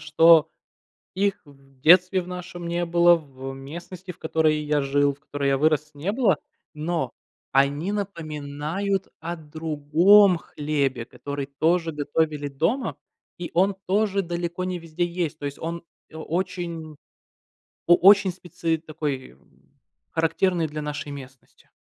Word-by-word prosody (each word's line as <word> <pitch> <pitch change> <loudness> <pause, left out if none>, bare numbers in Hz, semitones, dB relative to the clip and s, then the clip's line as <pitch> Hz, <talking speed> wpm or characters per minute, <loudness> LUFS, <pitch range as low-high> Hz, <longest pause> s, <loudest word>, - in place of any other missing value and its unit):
что 160 +1 +6 0.7
их 200 +1 0
в 135 -2 -21
детстве 180 +5 +6
в 175 - -12
нашем 180 -1 -7
не 170 +1 0
было, 175 0 +5
в 135 -4 -8
местности, 170 +7 -9
в 180 - -9
которой 160 -1 +1
я 150 0 +1
жил, 140 +1 +2
в 140 - -28
которой 145 -2 -3
я 135 0 +2
вырос, 155 0 +2
не 165 +8 -2
было. 215 - +2 0.4
Но, 155 -3 -2 0.4
они 140 +6 +2
напоминают 165 0 -3
о 170 +1 -4
другом 160 +5 +4
хлебе, 140 -6 -2
который 140 +3 -6
тоже 165 +4 +1
готовили 150 0 -1
дома. 160 - -1 0.4
И 175 - -5
он 195 +3 +3
тоже 200 0 +1
далеко 175 0 -3
не 185 -1 -3
везде 165 +1 -3
есть. 170 -3 -3
То 145 - -5
есть 140 - -5
он 170 +1 -5 0.3
о 160 - -9
очень 170 -2 -4 0.9
о 175 - +8
очень 195 +1 +6
специ 170 -2 -3
такой, 150 - -5 0.8
характерный 165 +1 +1
для 150 0 -5
нашей 150 0 -5
местности. 135 -2 -12
160 Hz, 135 wpm, -24 LUFS, 145-175 Hz, 0.9 s, о